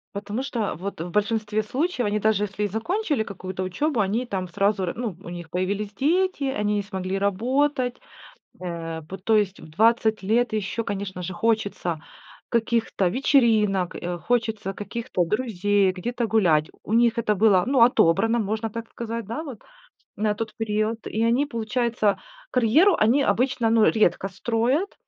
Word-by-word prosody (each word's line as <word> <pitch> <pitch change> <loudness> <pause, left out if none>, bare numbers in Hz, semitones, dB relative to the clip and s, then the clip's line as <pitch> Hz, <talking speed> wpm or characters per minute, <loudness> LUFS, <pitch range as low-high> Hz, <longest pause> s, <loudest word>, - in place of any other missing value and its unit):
Потому 205 +5 -3
что 230 -6 -2
вот 185 +1 -6
в 175 - -5
большинстве 215 +2 0
случаев 260 +2 -1
они, 210 +1 0
даже 210 -1 +2
если 205 +1 -3
и - - +1
закончили 290 - -1
какую-то 185 -2 -6
учёбу, 245 - -1
они 220 +5 0
там 185 -3 -3
сразу, 195 +2 +1
р 175 - -2
ну, 225 -7 -4
у - - -8
них 175 -2 -8
появились 200 +4 -2
дети, 340 - +1
они 210 -6 0
не 205 - 0
смогли 190 -1 -3
работать, 250 +6 0 0.6
э, 165 -2 -5
по 190 +5 -8
то 220 +4 +2
есть 205 -1 0
в - - -12
20 220 +3 +2
лет 235 +5 +2
еще, 215 +2 -2
конечно 195 -3 -4
же, 180 +1 -5
хочется 200 -6 -1 0.5
каких-то 225 -5 +1
вечеринок, 215 -7 +2
э, 175 0 -4
хочется 220 -2 -1
каких-то 225 -2 -3
друзей, 205 -1 +1
где-то 235 +6 -3
гулять. 175 -9 +2
У 215 - -4
них 235 0 +3
это 210 -2 +1
было, 200 -3 +4
ну, 260 -3 +5
отобрано, 225 +1 +3
можно 220 +1 -2
так 230 0 -6
сказать, 230 -1 -5
да, 300 +8 -4
вот, 260 -8 -8 0.6
на 210 0 +1
тот 225 +1 -5
период, 220 +1 -1
и 220 - -2
они, 245 +5 +2
получается, 230 -3 0 0.3
карьеру 295 - +4
они 235 +7 +4
обычно, 240 0 +1
ну, 225 -1 +5
редко 195 -3 +2
строят. 235 - 0
215 Hz, 165 wpm, -24 LUFS, 195-235 Hz, 0.6 s, ну